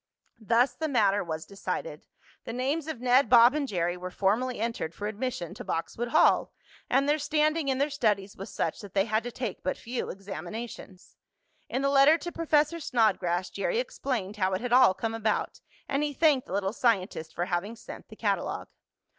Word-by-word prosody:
Thus 240 +3 +2
the 315 +5 -3
matter 205 -7 +2
was 160 -2 -5
decided. 200 - -5 0.4
The 230 - -5
names 280 +6 -1
of 315 -7 -4
Ned, 255 +2 +4
Bob 240 +1 +7
and 295 -2 -1
Jerry 175 -5 -1
were 180 0 -6
formally 215 +7 0
entered 225 -8 -3
for 205 - -5
admission 215 -5 -3
to - - -8
Boxwood 225 +8 -3
Hall, 310 - +4 0.4
and 275 +1 +3
their 300 +1 +2
standing 305 +1 +1
in 265 -1 +1
their 285 +2 0
studies 210 -7 0
was 195 - -8
such 160 - -2
that 205 -2 -12
they 195 0 +3
had 220 0 +1
to 245 +1 -6
take 235 -5 -5
but 185 - -2
few 245 +2 -4
examinations. 195 +1 -8 0.5
In 265 - -1
the 275 - +3
letter 280 +3 +6
to 345 +1 -6
Professor 315 0 +1
Snodgrass 190 - +1
Jerry - - -1
explained 240 - -3
how 190 -1 +1
it 185 - -1
had 245 0 -2
all 250 -7 +6
come 225 -1 -3
about, 220 -1 -1 0.3
and 275 +1 0
he 295 -1 -1
thanked 290 -3 +3
the - - -7
little 195 0 -1
scientist 190 -9 0
for 175 - -1
having 185 +5 -2
sent - - -11
the - - -12
catalogue. - - -2
230 Hz, 190 wpm, -28 LUFS, 195-275 Hz, 0.5 s, Bob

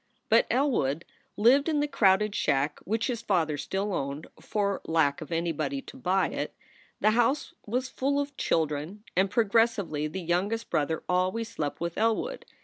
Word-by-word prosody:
But - - +5
Elwood 200 - +1 0.3
lived 265 +8 +5
in 305 -2 +1
the 295 - +1
crowded 210 -5 +3
shack 145 -4 0
which 225 +3 0
his 240 -3 -2
father 170 -9 +1
still 195 +7 -2
owned, 140 0 -3
for 200 -2 -1
lack 160 -2 +2
of 155 - -8
anybody 170 - -1
to - - -11
buy 190 -6 +1
it. - - -4 0.5
The 215 - +5
house 240 +6 +1
was 250 +4 -1
full 280 +2 0
of 285 0 -3
children, 160 +6 -1
and 190 +2 +3
progressively 215 -8 +2
the 185 +5 -5
youngest 195 +7 -1
brother 155 +2 0
al 180 +1 +2
ways 230 +1 -4
slept 150 -10 -4
with 170 +2 -3
Elwood. 230 - 0
200 Hz, 165 wpm, -28 LUFS, 165-235 Hz, 0.5 s, But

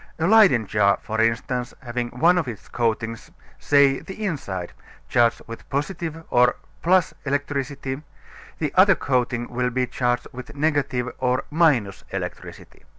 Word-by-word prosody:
A 160 - 0
Leyden 195 - +5
jar, 100 0 +2
for 110 0 -1
instance, 120 +2 -1
having 120 -1 -3
one 170 +9 +3
of 160 - -3
its 115 -5 -8
coatings 115 -1 -2 0.3
(say 140 -2 +4
the 210 +3 -7
inside) 100 - -4 0.3
charged 120 -1 +2
with 115 0 -10
positive 160 +2 -3
or 125 0 +4 0.4
+ 185 -5 +2
electricity, 140 -1 -2 0.6
the 150 -3 -2
other 190 +1 +6
coating 125 -4 -1
will 125 0 -1
be 125 +1 0
charged 120 -1 -1
with 125 +2 -9
negative 140 -4 0
or 125 -1 +1
electricity. 145 - -1
125 Hz, 135 wpm, -23 LUFS, 120-150 Hz, 0.6 s, other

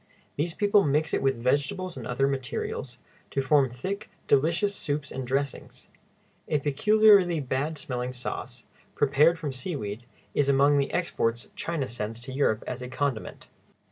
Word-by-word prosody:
These 165 +3 -2
people 205 -1 +4
mix 150 +3 +1
it - - +1
with 135 0 +2
vegetables 145 +9 0
and - - -6
other 130 +2 +1
materials, 130 -1 -3 0.3
to - - -2
form 135 0 +3
thick, 190 - -5 0.2
delicious 170 +9 +2
soups 145 -4 -3
and 130 -2 -5
dressings. 135 +1 -3 0.6
A 150 - +2
peculiarly 185 +4 +4
bad 145 +3 -2
smelling 125 -4 -3
sauce, 125 0 -6 0.3
prepared 145 +4 +4
from 150 -4 -4
seaweed, 130 - -4 0.3
is 145 -1 +2
among 140 +1 +4
the 140 - 0
exports 120 -9 -1
China 160 -6 -2
sends 115 -1 -5
to 130 +2 -7
Europe 130 -5 +1
as 125 0 -5
a 125 - -5
condiment. 130 -2 -3
140 Hz, 150 wpm, -27 LUFS, 130-160 Hz, 0.6 s, people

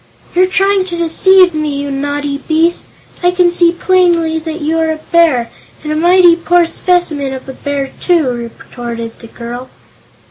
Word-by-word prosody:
"You're 370 +1 +3
trying 390 0 +1
to 350 -2 -5
deceive 360 +2 +4
me, 305 -2 -2
you 285 0 -4
naughty 285 +1 -3
beast! 325 +4 0 0.3
I 355 - +3
can 360 -1 +2
see 345 -1 +3
plainly 345 -3 +1
that 320 0 -6
you 320 +2 -1
are 320 0 0
a 315 - -2
bear, 315 -9 +2 0.3
and 305 - -4
a - - -1
mighty 350 +1 +5
poor 345 0 +2
specimen 330 -6 -1
of 260 - -10
a 265 - -7
bear, 280 0 -4
too," 340 -6 +2 0.2
retorted 235 -1 -8
the 230 - -12
girl. 240 +2 -8
320 Hz, 170 wpm, -13 LUFS, 280-350 Hz, 0.3 s, mighty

